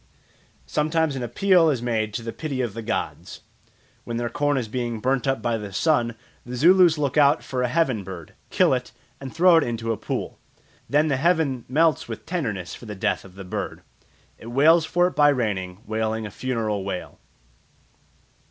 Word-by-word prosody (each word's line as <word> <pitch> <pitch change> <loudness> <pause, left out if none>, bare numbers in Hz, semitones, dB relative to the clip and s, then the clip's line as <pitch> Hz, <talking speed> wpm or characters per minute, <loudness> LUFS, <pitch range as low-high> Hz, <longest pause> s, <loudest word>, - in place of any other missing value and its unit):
Sometimes 155 -1 0
an 130 - -4
appeal 165 - +3
is 135 -5 0
made 110 -3 -1
to 115 - -3
the 115 0 -5
pity 135 +2 -4
of 120 -5 -2
the 115 - -6
gods. 110 0 -4 0.6
When 115 - -4
their 120 0 -2
corn 145 -1 +1
is 120 -4 -2
being 120 0 -3
burnt 130 +2 0
up 135 -5 0
by 115 -1 0
the 105 -1 -7
sun, 120 - +1 0.3
the 125 +1 -7
Zulus 175 +3 +5
look 145 -1 -1
out 145 +1 +4
for 130 -1 -3
a 125 - +1
"heaven 130 -7 0
bird," 90 -4 -9 0.2
kill - - +3
it, - - -3 0.3
and 135 -1 -7
throw 175 +1 +5
it 165 - +4
into 115 -1 -2
a 110 - -2
pool. - - -4 0.5
Then 150 +2 +3
the 140 -3 +1
heaven 150 -5 +1
melts 155 +2 +2
with 115 -2 -7
tenderness 110 - -3
for 120 - -10
the 105 - -6
death 95 - -1
of 95 -1 -15
the 95 - -8
bird; 90 - -5 0.6
"it 115 - -11
wails 155 +7 +4
for 175 +2 +2
it 180 - -1
by 145 0 +5
raining, 100 -8 -2
wailing 110 0 -2
a 105 - -7
funeral 110 -4 -2
wail." 95 -2 -6
125 Hz, 190 wpm, -24 LUFS, 110-150 Hz, 0.6 s, Zulus